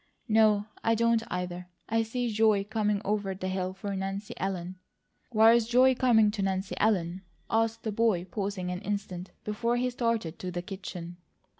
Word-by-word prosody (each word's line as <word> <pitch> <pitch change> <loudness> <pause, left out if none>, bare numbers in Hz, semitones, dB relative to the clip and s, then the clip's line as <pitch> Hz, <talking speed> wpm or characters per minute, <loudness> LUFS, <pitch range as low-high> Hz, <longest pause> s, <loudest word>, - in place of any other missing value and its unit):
No, 215 -2 +4 0.2
I 225 0 +3
don't, 230 0 +3
either! 180 0 -4 0.2
I 225 +1 +2
see 235 +1 -2
joy 215 -2 +3
coming 210 -1 -1
over 205 -2 -1
the 185 0 -4
hill 185 -1 -2
for 200 0 -4
Nancy 195 +2 -4
Ellen." 185 -1 -3 0.5
"Why 225 0 +7
is 235 -2 +3
joy 255 +2 +5
coming 225 -4 +4
to 205 -1 -3
Nancy 190 0 -1
Ellen?" 185 -4 +1 0.3
asked 225 0 +1
the 220 - -2
boy, 210 -5 +1
pausing 190 -1 -3
an 180 +1 -4
instant 195 -3 -4
before 230 +3 0
he 250 +1 0
started 230 -9 -1
to 185 - -4
the 175 -1 -4
kitchen. 180 -3 -7
205 Hz, 170 wpm, -29 LUFS, 185-225 Hz, 0.5 s, Why